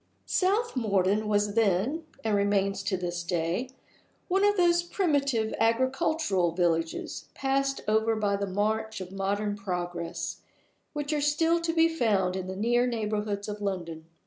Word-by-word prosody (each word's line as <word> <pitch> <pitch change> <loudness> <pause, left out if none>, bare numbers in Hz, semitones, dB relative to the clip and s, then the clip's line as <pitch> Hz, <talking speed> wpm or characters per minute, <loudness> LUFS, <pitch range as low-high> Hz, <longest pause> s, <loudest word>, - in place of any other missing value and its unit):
South 410 +4 +1
Morden 205 -2 +1
was 205 -1 +1
then 230 - +1 0.2
(and 220 -2 +1
remains 200 -1 +1
to 195 -1 -1
this 175 -1 -3
day) 170 +7 -1 0.6
one 385 +2 +2
of 410 0 +4
those 345 -1 +4
primitive 280 - 0
agricultural 230 - +1
villages, 165 -2 -1
passed 275 0 0
over 220 +1 +2
by 205 -2 +1
the 200 0 -2
march 215 +3 -1
of 185 -1 -7
modern 200 +2 -1
progress, 175 -3 -4 0.6
which 295 0 -2
are 295 - 0
still 325 +3 +2
to 335 0 0
be 325 0 +4
found 210 - +1
in 185 -1 -4
the 190 - -5
near 240 +4 +2
neighborhood 210 -3 -2
of 210 0 -5
London. 170 -5 -4
210 Hz, 145 wpm, -28 LUFS, 190-275 Hz, 0.6 s, of